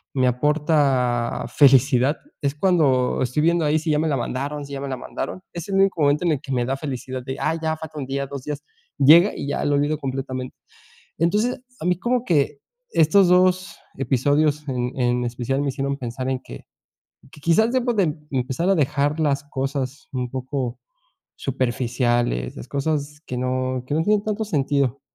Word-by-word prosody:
me 130 -1 +3
aporta 135 -4 +1
felicidad 135 0 +4 0.3
es 140 0 +1
cuando 145 -8 +2
estoy 130 +5 0
viendo 170 0 +3
ahí 155 +1 +2
si 155 0 -1
ya 150 - +2
me 160 0 +1
la 140 - +1
mandaron 140 +4 -3
si 140 - -10
ya 135 - -4
me 140 - -4
la 130 - -3
mandaron, 185 +7 -5
es 170 +4 -6
el 195 - -1
único 195 -4 +3
momento 145 +4 +3
en 165 - +3
el 140 - -3
que 140 -3 -8
me 120 -1 +1
da 135 +2 -1
felicidad 130 -3 -5
de, 130 0 -5
ah, 160 +1 0
ya 160 0 -1
falta 155 -1 -9
1 135 - -3
día, 140 0 -2
2 140 -2 -7
días, 150 -1 -4 0.4
llega 165 +8 +7
y 140 - -5
ya, 145 - -1
lo 145 0 +2
olvido 145 +2 +1
completamente. 130 -2 -4 0.6
Entonces, 210 +10 +1 0.2
a - - -4
mí 180 0 +3
como 245 +1 0
que 145 -4 +1 0.3
estos 175 +4 +5
2 180 -1 +3 0.2
episodios 145 +3 +1
en 125 -1 -2
en 125 0 +1
especial 125 +3 -2
me 140 - 0
hicieron 140 +1 -2
pensar 125 +1 -5
en 130 -1 -1
que - - -9 0.8
que 150 - -14
quizás 220 +8 +4
debo 250 -2 +1
de 200 -3 +3 0.3
empezar 130 +6 -1
a 195 - +4
dejar 145 +1 +1
las 140 -2 +1
cosas 135 +1 -3
un 125 -2 -3
poco 130 -1 -3 0.6
superficiales, 120 - 0
las - - -8
cosas 145 +1 -2
que 125 - -4
no 130 0 -1
que - - -2
no 160 - +2
tienen 210 +1 +2
tanto 215 0 -2
sentido, 140 - 0
140 Hz, 190 wpm, -23 LUFS, 130-160 Hz, 0.8 s, llega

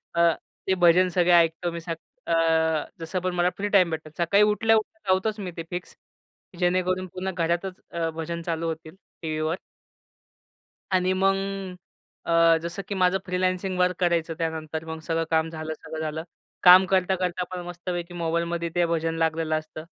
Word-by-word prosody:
अ, 170 -1 +4 0.3
ते 190 - +3
भजन 180 +1 +5
सगळे 180 -1 +2
ऐकतो 170 +1 +3
मी 170 - -5
सग 165 0 -4 0.3
अ, 160 -2 +2
जसं 165 +3 -3
पण 185 0 -1
मला 175 0 +3
फ्री 205 +1 -2
टाईम 185 -4 +5
भेटतो. 155 -1 -4
सकाळी 200 +4 +4
उठल्या-उठल्या 215 -1 +1
लावतोच 210 +3 +1
मी 185 -3 -4
ते 165 - -3
फिक्स. 175 0 -6 0.6
जेणेकरून 185 +1 +1
पुन्हा 185 +2 -4
घरातच 180 +2 -2
अ, 165 -1 -1
भजन 170 +1 -4
चालू 165 -1 -2
होतील 160 +1 -6 0.3
टीव्हीवर. 155 0 -1 1.4
आणि 185 0 +2
मग 195 0 +4 0.9
अ, 165 0 +5
जसं 170 +4 -4
की 200 - -3
माझं 185 0 +3
फ्रीलान्सिंग 185 0 -1
वर्क 180 -1 +3
करायचं 170 -2 +1
त्यानंतर 160 -1 -3
मग 160 0 -6
सगळं 165 0 -1
काम 160 0 +2
झालं, 155 -1 -5
सगळं 160 0 -8
झालं. 155 +1 -3 0.4
काम 185 +1 +9
करता-करता 185 -1 +1
पण 180 -1 -4
मस्तपैकी 175 0 -5
मोबाईलमध्ये 170 0 -1
ते 175 0 +3
भजन 165 -1 -1
लागलेलं 160 -1 0
असतं. 155 0 -10
170 Hz, 160 wpm, -25 LUFS, 165-185 Hz, 1.4 s, काम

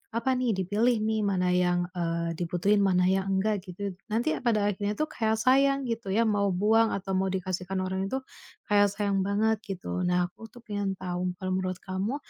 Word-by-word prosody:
apa 235 +3 +1
nih, 245 -4 +1
dipilih 210 +6 +1
nih 220 0 0
mana 180 -2 +1
yang, 175 -1 +2
eee, 170 -1 -1
dibutuhin 180 +4 +1
mana 180 -2 +3
yang 190 +1 +1
enggak, 205 +1 +1
gitu 200 +2 -4
it - - -19 0.2
nanti 235 +8 +1
pada 215 -4 +2
akhirnya 205 +2 -2
tuh 310 - 0
kayak 220 -1 0
yang - - -5
sayang, 275 +2 +4
gitu 230 -3 -3
ya, 230 +3 +3
mau 205 -2 +2
buang 220 +4 +3
atau 195 0 -5
mau 190 - +1
dikasihkan 185 0 -3
orang 190 +1 -2
itu 265 - -1 0.5
kayak 205 -1 +5
sayang 200 -2 0
banget, 215 +2 +1
gitu. 180 -1 -3
Nah, 180 0 +2
aku 225 - -12
tuh 245 - -14
pengen 205 -3 -2
tahu, 180 0 -2
kalau 185 -1 -3
menurut 185 0 -1
kamu, 195 +7 -2
200 Hz, 200 wpm, -28 LUFS, 185-220 Hz, 0.5 s, kayak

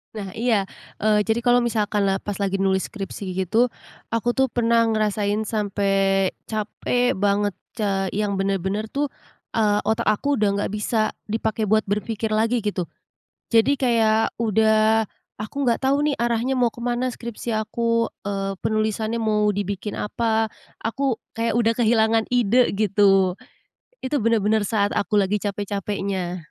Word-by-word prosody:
Nah 195 -3 -6
iya, 225 -4 +1 0.3
eee, 210 0 +3
jadi 220 +2 0
kalau 245 0 +5
misalkan 215 -3 0
la 195 - +1
pas 205 - -5
lagi 195 0 0
nulis 190 -1 0
skripsi 200 -3 -6 0.2
gitu, 230 +7 +2 0.4
aku 235 +1 0
tuh 265 -1 +2
pernah 230 0 +2
ngerasain 215 0 0
sampai 195 -2 +1 0.2
capek 235 +3 0
banget, 205 +1 +1 0.2
ca 195 -3 0
yang 205 0 -1
bener-bener 195 +2 -1
tuh, 285 +4 -1 0.5
eee, 210 -2 +2
otak 220 +1 +1
aku 280 +7 +1
udah 210 -5 +2
enggak 200 - -2
bisa 215 +1 0 0.2
dipakai 220 -1 -1
buat 220 0 +3
berpikir 215 +2 -2
lagi 225 +3 +2
gitu, 205 -6 -2 0.6
jadi 230 +5 +5
kayak 225 -4 +3 0.2
udah, 220 0 +3 0.3
aku 250 +6 -3
enggak 235 +3 0
tahu 275 +2 +3
nih 295 -2 +1
arahnya 240 +2 0
mau 240 -3 +2
kemana 245 +1 -2
skripsi 235 0 -6
aku, 230 +1 0 0.2
eee, 195 -1 -2
penulisannya 220 +1 0
mau 210 -1 +2
dibikin 200 +1 -3
apa, 220 +1 0 0.3
aku 245 +2 -1 0.2
kayak 230 0 0
udah 230 -1 +2
kehilangan 225 -1 +3
ide 245 0 +3
gitu, 195 -2 +3 0.7
itu 275 +2 0
benar-benar 215 -2 +2
saat 205 -2 +1
aku 210 +1 0
lagi 200 +1 +2
capek-capeknya. 200 -2 -3
215 Hz, 145 wpm, -23 LUFS, 200-230 Hz, 0.7 s, kalau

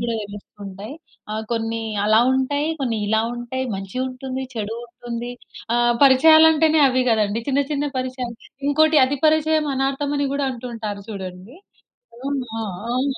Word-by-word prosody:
కూడా 235 0 -1
తెలుస్తూ 205 0 -11
ఉంటాయి. 200 +7 -8 0.4
ఆహ్, 215 +1 -3
కొన్ని 225 0 -2 0.2
అలా 215 +1 +5
ఉంటాయి, 285 +3 0
కొన్ని 240 -4 0
ఇలా 220 +1 +2
ఉంటాయి. 240 +2 -4
మంచి 195 +3 -7
ఉంటుంది. 260 0 -5
చెడు 220 -1 -3
ఉంటుంది. 240 0 -6 0.4
ఆ! - - +3 0.3
పరిచయాలంటేనే 315 +3 +6
అవి 255 0 +2
కదండీ. 215 0 +1
చిన్న, 275 0 +2
చిన్న 290 0 0
పరిచయాలు. 255 -2 -4 0.3
ఇంకోటి 310 +1 +4
అతి 275 +2 -1
పరిచయం 310 0 +3
అనార్థం 270 +2 -1
అని 285 - +1
కూడా 280 0 0
అంటుంటారు 230 -4 -6
చూడండి. 190 - -8 0.6
అవును. 270 0 -3
ఆ! - - -2 0.3
అవును. 265 +2 0
255 Hz, 145 wpm, -22 LUFS, 225-280 Hz, 0.6 s, పరిచయాలంటేనే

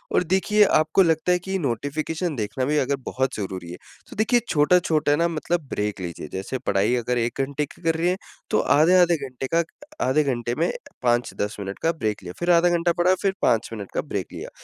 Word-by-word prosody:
और - - +4
देखिए 190 +4 +3
आपको 155 +5 +3
लगता 165 +1 +2
है 180 - +3
कि 190 +2 -3
नोटिफ़िकेशन 150 +5 -2
देखना 110 +4 -2
भी 150 +3 +1
अगर 140 0 +1
बहुत 130 0 -1
ज़रूरी 95 -4 -5
है। 90 - -7 0.3
तो - - -10
देखिए 235 +3 +3
छोटा-छोटा 155 -1 +3
ना 170 +3 +2
मतलब 170 +1 -1
ब्रेक 105 -2 -2
लीजिए। 85 -3 -6
जैसे 95 +7 -3
पढाई 100 +5 +2
अगर 125 +1 -1
1 120 +3 -1
घंटे 140 +2 -2
की 145 - -17
कर 165 -1 +2
रही 165 +2 0
है 185 - 0 0.3
तो - - +3
आधे-आधे 175 +3 +4
घंटे 130 +1 -5
का, 170 - +4 0.4
आधे 150 +3 +3
घंटे 120 -3 -2
में 170 - +2 0.3
5-10 120 -4 0
मिनट 100 0 -6
का 165 - +3
ब्रेक 110 - -3
लिया। 90 0 -7
फिर 175 +1 +2
आधा 175 +1 +5
घंटा 175 0 +2
पढ़ा 180 +2 +4
फिर 195 -1 +1
5 115 0 +2
मिनट 100 -3 -7
का - - 0
ब्रेक - - -4
लिया। - - -7
145 Hz, 210 wpm, -24 LUFS, 120-170 Hz, 0.4 s, आधा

